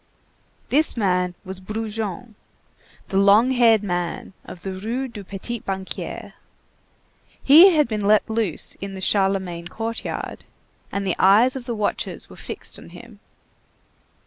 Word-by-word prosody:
This 300 0 +2
man 180 -4 +1
was 190 0 -6
Brujon, 215 +1 -5 0.8
the 195 - +1
long 205 +6 +5
haired 230 -4 +4
man 175 -1 -3
of 175 - -11
the 195 - -4
Rue 230 +8 -3
du 215 -5 -9
Petit 200 +5 -6
Banquier. 190 -2 -5 1.1
He 335 +6 +8
had 300 -2 +3
been 215 -2 -3
let 210 +1 +4
loose 220 -7 -1
in 195 0 -6
the - - -7
Charlemagne 190 -3 0
courtyard, 225 +5 -5 0.5
and 200 0 -2
the 185 - 0
eyes 220 +7 +5
of 260 -2 -6
the 240 -2 -3
watchers 210 -1 -3
were - - -11
fixed - - -6
on - - -13
him. - - -13
210 Hz, 140 wpm, -22 LUFS, 190-230 Hz, 1.1 s, He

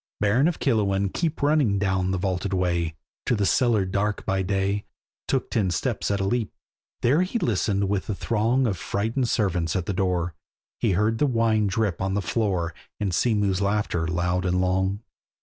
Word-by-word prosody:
Baron 115 +8 +3
of 175 - -1
Killowen 100 -6 +1
keep 160 -4 -2
Running 145 -9 +3
down 95 -2 0
the 95 - 0
vaulted 95 +1 -2
way, 85 -3 0 0.3
To 120 - +3
the 105 -2 +1
cellar 110 -2 +3
dark 100 +2 -1
by 95 0 0
day, 100 +2 -1 0.4
Took 135 -2 -1
the - - +1
ten 95 -3 +1
steps 85 - -1
at 100 -1 0
a - - 0
leap. 110 +2 0 0.5
There 140 +8 +3
he 185 +6 -1
listened 100 - 0
with 100 -1 -1
the 105 - -2
throng 115 +5 +1
Of 100 -6 -1
frighted 115 +5 -1
servants 90 -8 0
at 90 -2 -1
the 100 - -2
door, 90 -2 0 0.5
He - - +2
heard 110 +4 +1
the 145 - +3
wine 115 -4 +2
drip 100 -3 -1
on 95 0 0
the 100 - +1
floor, 85 -1 -1 0.3
And 100 -4 -1
sea 115 +5 +2
mew's 100 -2 +1
laughter 100 -5 0
loud 90 +1 0
and 90 0 +1
long. 95 +2 0
100 Hz, 190 wpm, -25 LUFS, 95-110 Hz, 0.5 s, Baron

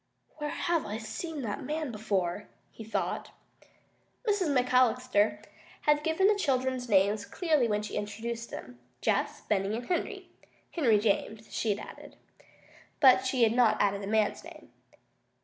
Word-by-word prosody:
"Where 295 -1 -3
have 340 +1 0
I 210 - -3
seen 295 +7 -5
that 210 -3 -3
man 305 -2 -3
before?" 205 -4 -2 0.2
he 225 - -10
thought. 220 - -3 1.0
Mrs. 405 -4 +2
McAllister 250 -5 +2 0.4
had 295 0 +2
given 320 +4 +1
the 420 - +6
children's 260 - -1
names 200 +1 +3
clearly 310 - +1
when 210 -1 0
she 210 - -7
introduced 225 +3 -4
them 125 0 -9 0.2
Jess, 210 -2 0
Benny, 200 0 0
and 240 - -6
Henry. 355 - -3 0.4
Henry 245 -11 +3
James, 215 +1 -1
she 215 -3 0
had - - -8
added. - - -12 0.8
But 260 -2 +6
she 255 -2 +2
had 225 -1 +4
not 240 -3 +3
added 200 0 +1
the 195 - -5
man's 215 0 +1
name. - - -13
230 Hz, 150 wpm, -29 LUFS, 210-275 Hz, 1.0 s, the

